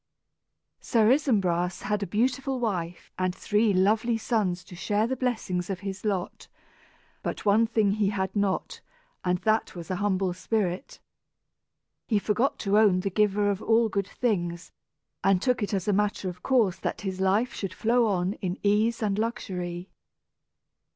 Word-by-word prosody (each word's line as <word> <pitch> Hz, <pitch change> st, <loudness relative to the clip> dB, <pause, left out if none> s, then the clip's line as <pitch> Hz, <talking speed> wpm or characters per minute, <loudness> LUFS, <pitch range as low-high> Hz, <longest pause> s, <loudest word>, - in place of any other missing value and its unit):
Sir 225 Hz, -2 st, +3 dB
Isumbras 190 Hz, -, +1 dB
had 210 Hz, -1 st, -1 dB
a 200 Hz, -, -2 dB
beautiful 255 Hz, +6 st, 0 dB
wife 180 Hz, -7 st, -3 dB
and 185 Hz, -1 st, 0 dB
three 210 Hz, +1 st, +2 dB
lovely 215 Hz, +5 st, +2 dB
sons 205 Hz, -6 st, -1 dB
to 180 Hz, -, -12 dB
share 205 Hz, +4 st, 0 dB
the 260 Hz, +3 st, -1 dB
blessings 220 Hz, -8 st, -2 dB
of 190 Hz, -1 st, -3 dB
his 195 Hz, -1 st, -6 dB
lot; 195 Hz, -4 st, -3 dB, 0.7 s
but -, -, -4 dB
one 215 Hz, +3 st, +4 dB
thing 220 Hz, -3 st, +2 dB
he 205 Hz, -1 st, +1 dB
had 190 Hz, -1 st, -2 dB
not, 200 Hz, -2 st, -1 dB, 0.4 s
and 180 Hz, 0 st, +1 dB
that 220 Hz, -2 st, +1 dB
was 170 Hz, 0 st, -7 dB
an 185 Hz, -, -1 dB
humble 190 Hz, -2 st, 0 dB
spirit. 185 Hz, +2 st, -2 dB, 1.1 s
He 215 Hz, -, +2 dB
forgot 220 Hz, +6 st, 0 dB
to 205 Hz, 0 st, +3 dB
own 195 Hz, -4 st, +4 dB
the 195 Hz, +1 st, -2 dB
Giver 205 Hz, 0 st, +2 dB
of 200 Hz, +1 st, -4 dB, 0.3 s
good 200 Hz, 0 st, -1 dB
things, 175 Hz, -9 st, -2 dB, 0.5 s
and 195 Hz, -2 st, +4 dB
took 250 Hz, +4 st, +1 dB
it 205 Hz, -, -1 dB
as 195 Hz, -2 st, -2 dB
a 205 Hz, -, +3 dB
matter 205 Hz, 0 st, 0 dB
of 180 Hz, 0 st, -10 dB
course 220 Hz, -8 st, +2 dB
that -, -, -3 dB
his 190 Hz, -2 st, -4 dB
life 205 Hz, +6 st, +2 dB
should 190 Hz, -2 st, -5 dB
flow 235 Hz, +1 st, +2 dB
on 185 Hz, -1 st, 0 dB
in 185 Hz, -1 st, -2 dB
ease 215 Hz, +3 st, +2 dB
and 205 Hz, -1 st, 0 dB
luxury. 185 Hz, -6 st, -4 dB
200 Hz, 160 wpm, -27 LUFS, 185-220 Hz, 1.1 s, one